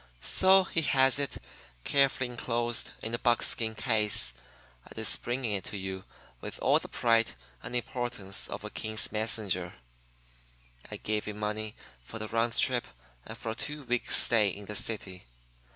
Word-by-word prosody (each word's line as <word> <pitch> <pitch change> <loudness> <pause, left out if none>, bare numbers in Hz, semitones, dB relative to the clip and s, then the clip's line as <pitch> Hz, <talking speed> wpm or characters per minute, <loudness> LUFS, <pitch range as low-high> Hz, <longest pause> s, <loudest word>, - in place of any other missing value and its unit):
"'So 190 - +5
he 165 -3 -1
has 135 -2 +3
it, 140 -2 -2 0.5
carefully 135 -2 +2
enclosed 120 0 -2
in 115 - -4
a 120 - -1
buck 120 -2 +2
skin 110 -1 +1
case, 105 - +1 0.5
and - - -15
is - - +3
bringing 120 -2 -3
it 100 -2 -2
to 105 - -6
you 95 0 -6 0.3
with - - -7
all - - +3
the - - -8
pride 115 - +2 0.3
and 125 - -6
importance 120 -5 -2
of - - -6
a - - -7
king's 110 0 0
messenger. 105 -5 0 1.1
I - - -6
gave 105 0 -2
him 105 -1 -6
money 105 0 -3 0.3
for 110 - -8
the 110 -1 -5
round 115 0 0
trip - - +2 0.4
and 115 - -7
for 115 -2 -4
a - - -5
two 150 +4 -3
weeks' 125 -1 +4
stay 110 -4 +4
in 100 +2 -7
the 105 - -6
city. 95 - -2
115 Hz, 170 wpm, -29 LUFS, 105-120 Hz, 1.1 s, So